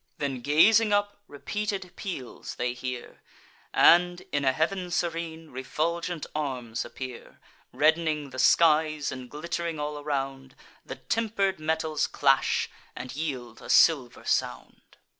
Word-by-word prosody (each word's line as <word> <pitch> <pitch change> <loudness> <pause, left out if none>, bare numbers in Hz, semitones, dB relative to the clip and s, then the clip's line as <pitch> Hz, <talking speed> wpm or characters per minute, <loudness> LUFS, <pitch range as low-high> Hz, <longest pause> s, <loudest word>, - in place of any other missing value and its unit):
Then, 135 -3 -3
gazing 210 - +5
up, 205 0 0
repeated 195 +4 -4
peals 140 - -6
they 125 0 -1
hear; 125 -1 -7 0.5
And, 175 +1 +5
in 145 -1 0
a 135 - +4
heav'n 180 +6 -1
serene, 165 -2 -3
refulgent 165 +5 -2
arms 130 -6 -3
appear: 130 -2 -9 0.3
Redd'ning 155 -2 +1
the 130 - -7
skies, 155 +1 +4
and 130 -1 -8
glitt'ring 170 +1 -4
all 150 0 -3
around, 135 -2 -4 0.3
The - - -7
temper'd 200 -5 -1
metals 160 -1 0
clash, 135 -1 +2 0.3
and 130 +1 -7
yield 130 -7 -5
a - - -11
silver 135 -7 +4
sound. - - -3
155 Hz, 120 wpm, -27 LUFS, 135-170 Hz, 0.5 s, gazing